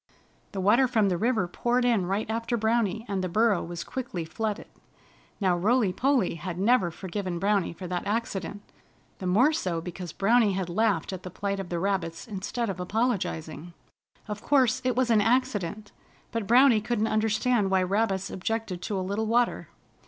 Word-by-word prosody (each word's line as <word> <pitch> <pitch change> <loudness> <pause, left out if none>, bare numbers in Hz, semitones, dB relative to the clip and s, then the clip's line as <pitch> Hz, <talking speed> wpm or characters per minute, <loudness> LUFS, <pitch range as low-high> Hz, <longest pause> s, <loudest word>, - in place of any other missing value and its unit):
The 195 - -5
water 220 +8 +4
from 220 -5 +2
the 180 - 0
river 225 -5 +1
poured 245 +7 0
in 220 -7 +2
right 200 +3 -1
after 230 +2 -1
Browny 220 -1 0
and 195 -2 -2
the 185 - -2
burrow 215 +1 +2
was 170 0 -6
quickly 235 -10 -5
flooded. 220 +5 -3 0.7
Now 185 -4 +2
Rolly 210 +2 +2
Polly 265 -5 +1
had 170 +1 -6
never 200 -1 +3
forgiven 185 +1 -4
Browny 200 0 +1
for 175 +2 -9
that 180 +1 -3
accident, 205 -2 -3 0.6
the 185 - -4
more 245 +12 +4
so 180 - -1
because 175 0 -7
Browny 215 +2 +3
had 185 -2 -2
laughed 195 -2 0
at 185 - -6
the 185 - -7
plight 200 +2 -3
of 190 -2 -5
the 175 - -2
rabbits 180 -2 -2
instead 215 +3 -3
of 190 -3 -4
apologizing. 180 -5 -2 0.5
Of 210 -1 -5
course, 260 -4 +3
it 250 -2 0
was 250 -1 +2
an 215 -2 +5
accident, 215 -4 0 0.4
but 230 -4 -3
Browny 245 -1 +6
couldn't 220 0 0
understand 220 0 +1
why 190 -1 +3
rabbits 195 0 0
objected 190 -2 -3
to 200 - -3
a 185 - -3
little 205 +3 -2
water. 240 +2 +1
205 Hz, 175 wpm, -27 LUFS, 185-230 Hz, 0.7 s, Browny